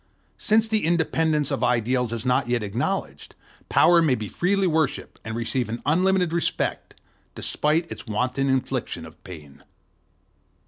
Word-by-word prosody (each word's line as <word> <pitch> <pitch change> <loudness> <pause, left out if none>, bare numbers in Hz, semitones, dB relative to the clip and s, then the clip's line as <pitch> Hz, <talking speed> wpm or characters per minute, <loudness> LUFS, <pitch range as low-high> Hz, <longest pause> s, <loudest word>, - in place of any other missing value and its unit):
Since 220 +1 +3
the 220 -1 +1
independence 160 -3 +1
of 120 - -1
ideals 125 0 +1
is 115 +1 -4
not 125 0 +1
yet 120 -2 0
acknowledged, 105 +5 -3 0.3
Power 170 -1 +5
may 150 -6 +3
be 110 -3 -5
freely 195 - +1
worshiped, 160 -5 -1
and 110 0 -5
receive 120 +1 -2
an 115 +2 -4
unlimited 180 +2 +2
respect, 170 - -2 0.4
despite 160 +3 0
its - - -8
wanton 125 +5 -1
infliction 130 -1 -2
of - - -15
pain. 75 -6 -12
135 Hz, 140 wpm, -24 LUFS, 120-170 Hz, 0.4 s, Power